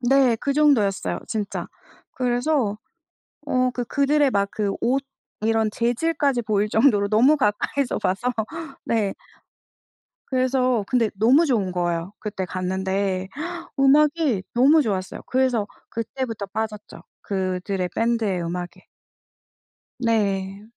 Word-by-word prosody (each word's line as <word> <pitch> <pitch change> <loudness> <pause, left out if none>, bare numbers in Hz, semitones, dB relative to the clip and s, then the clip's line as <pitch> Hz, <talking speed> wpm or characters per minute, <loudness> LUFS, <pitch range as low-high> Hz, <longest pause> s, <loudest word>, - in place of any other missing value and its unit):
네. 255 -1 +4
그 280 - 0
정도였어요, 275 -10 +2
진짜. 215 -2 -3 0.5
그래서 245 -2 0 0.7
어 255 -1 +2
그 245 - -2
그들의 285 +2 +2
막 200 -2 +1
그 205 -2 -1
옷 265 +3 +1 0.4
이런 220 0 +2
재질까지 260 +3 0
보일 210 -1 0
정도로 220 -3 +3
너무 235 +8 +5
가까이서 260 +2 0
봐서 200 +7 0 0.5
네. 215 -4 0 1.1
그래서 255 -3 +1
근데 235 -4 +2
너무 245 +11 +4
좋은 210 -9 0
거예요. 175 0 -2
그때 205 -3 -4
갔는데 190 +1 -2 0.5
음악이 290 - +3
너무 285 +6 +5
좋았어요. 195 -6 -3
그래서 250 -5 +1 0.2
그때부터 230 -2 -4
빠졌죠, 210 +1 -5 0.2
그들의 185 -1 -2
밴드의 225 -6 0
음악에. 175 +1 -5 1.2
네. 200 -4 0
225 Hz, 250 characters per minute, -23 LUFS, 200-260 Hz, 1.2 s, 너무